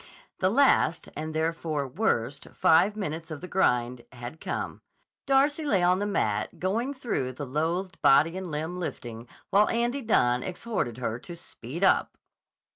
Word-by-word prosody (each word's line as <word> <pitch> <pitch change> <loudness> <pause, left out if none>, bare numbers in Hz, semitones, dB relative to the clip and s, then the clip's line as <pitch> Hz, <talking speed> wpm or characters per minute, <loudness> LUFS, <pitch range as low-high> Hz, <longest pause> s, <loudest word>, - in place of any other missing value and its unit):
The 185 - +3
last, 225 - +3
and 155 +2 -4
therefore 160 -2 -1
worst, 135 - -1
five 190 +6 +4
minutes 165 -5 -4
of 155 -2 -6
the 180 - -8
grind 125 -9 +1
had 120 +5 -9
come. - - -4 0.5
Darcy 280 +3 +3
lay 200 -12 +2
on 180 +1 +4
the 205 - -1
mat 105 - -1
going 225 +9 0
through 170 - -2
the 145 +3 -6
loathed 165 +7 -2
body 155 +5 +5
and 190 -1 -5
limb 160 +4 -3
lifting 120 -8 -6 0.2
while 205 +2 +5
Andy 240 +4 0
Dunne 125 - +2
exhorted 185 - -3
her 120 -2 -3
to 175 +7 -9
speed 165 0 -7
up. 190 - +3
165 Hz, 155 wpm, -27 LUFS, 130-200 Hz, 0.5 s, body